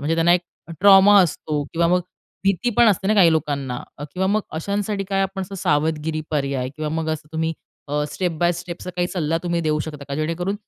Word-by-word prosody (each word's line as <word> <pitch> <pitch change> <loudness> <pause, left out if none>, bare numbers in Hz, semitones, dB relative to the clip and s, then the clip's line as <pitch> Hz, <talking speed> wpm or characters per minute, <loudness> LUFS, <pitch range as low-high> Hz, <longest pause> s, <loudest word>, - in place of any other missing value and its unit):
म्हणजे 150 +3 0
त्यांना 165 +1 +4
एक 180 - +3
एखादा 170 -1 -15
ट्रॉमा 200 +1 +8
असतो 150 -3 -2
किंवा 170 0 +2
मग 180 +1 +3 0.4
भीती 195 +5 +1
पण 240 - +6
असते 190 -2 +1
ना 215 - +3
काही 175 -6 +6
लोकांना. 140 -5 -2 0.3
किंवा 190 +1 0
मग 210 +3 +2
तर - - -15
अशांसाठी 200 +3 -2
काय 195 0 0
आपण 195 0 -3
असं 185 - -7
काही 195 - -6
सावधगिरी 155 +1 0
पर्याय 140 -4 -1
किंवा 155 0 -3
मग 160 - -3
असं 155 -1 -5
तुम्ही 160 0 -1 0.4
अ, 150 +1 0
स्टेप 180 -3 -2
बाय 175 +1 +3
स्टेप 175 0 -6
असा 180 - -6
काही 175 - +1
सल्ला 165 -3 -1
तुम्ही 170 -1 -1
देऊ 155 -1 +1
शकता 150 -2 -6
का, 140 - -3
जेणेकरून 165 +6 -2
170 Hz, 225 wpm, -22 LUFS, 155-190 Hz, 0.4 s, ट्रॉमा